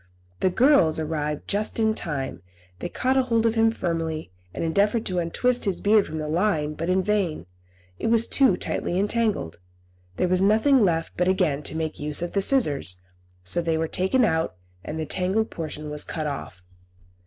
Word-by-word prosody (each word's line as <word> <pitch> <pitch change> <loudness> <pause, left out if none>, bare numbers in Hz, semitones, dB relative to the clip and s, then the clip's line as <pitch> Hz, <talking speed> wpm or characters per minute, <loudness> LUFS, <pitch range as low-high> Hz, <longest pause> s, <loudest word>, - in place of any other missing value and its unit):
The 185 - +2
girls 230 - +4
arrived 150 -2 -3
just 210 +1 0
in 220 -1 +2
time. 135 - -4 0.4
They 175 - -4
caught 260 +7 0
hold 230 -3 +2
of 225 - +3
him 225 0 +3
firmly, 165 - -3 0.2
and - - -4
endeavoured 205 +7 +1
to 180 -1 -1
untwist 245 +10 0
his 195 -3 -1
beard 210 0 +3
from 160 - -5
the 155 -1 -3
line, 155 -2 0
but 165 +3 -4
in 185 +1 +2
vain; 195 - -1 0.5
it - - -2
was 230 0 +3
too 260 -10 +3
tightly 175 - -2
entangled. 210 - -1 0.6
There - - +1
was 185 +1 +2
nothing 220 +6 +4
left 165 -3 0
but 180 - +1
again 180 -7 +1
to 155 - -3
make 160 -1 -3
use 150 +3 0
of 175 - -4
the 200 - +1
scissors; 145 - +2 0.4
so 95 - +1
they 165 -1 0
were 160 0 -1
taken 190 +10 +2
out, 160 - 0 0.3
and 155 +1 -5
the 160 - -2
tangled 190 +7 -1
portion 150 -2 -6
was 150 0 -3
cut 155 -2 -4
off. 135 -10 -6
180 Hz, 185 wpm, -24 LUFS, 155-215 Hz, 0.6 s, girls